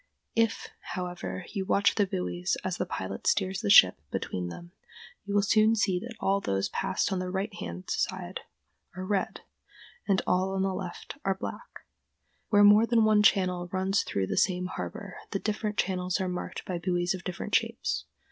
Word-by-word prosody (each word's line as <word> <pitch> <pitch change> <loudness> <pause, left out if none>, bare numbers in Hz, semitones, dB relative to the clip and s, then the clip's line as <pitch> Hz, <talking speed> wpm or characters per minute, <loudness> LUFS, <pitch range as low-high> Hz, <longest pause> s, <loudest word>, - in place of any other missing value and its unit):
If, 225 -1 +1 0.3
however, 180 0 -4
you 195 -3 -1
watch 200 +2 +3
the 205 -2 +2
buoys 90 - -2
as - - -2
the - - -2
pilot 95 +1 -5
steers 190 -1 +1
the - - -1
ship 95 - +8
between 90 -1 -3
them, 170 - -10 0.5
you 200 - -4
will 205 - +4
soon 215 +2 +4
see 195 -4 +1
that 230 +4 -8
all 200 +1 +1
those 95 - -1
passed 190 +1 -1
on 190 - -1
the 185 0 -3
right 195 +3 -2
hand 85 - -6
side - - -2 0.6
are 185 0 -5
red, 195 -1 -1 0.7
and 195 -2 +2
all 185 +1 +1
on 190 - +1
the 195 0 0
left 185 +8 -7
are 195 0 +1
black. - - -7 0.7
Where 205 -2 +6
more 210 +2 +7
than 230 -2 +4
one 215 -1 +5
channel 180 -4 +2
runs 190 +2 +1
through 95 - -1
the - - -3
same 180 -2 +2
harbor, 195 +1 -6
the - - -1
different 210 0 -2
channels 185 0 0
are 190 - -1
marked 180 0 -5
by 180 -2 -3
buoys 175 +1 0
of 185 -2 -7
different 180 +1 -5
shapes. - - 0
190 Hz, 185 wpm, -28 LUFS, 180-205 Hz, 0.7 s, ship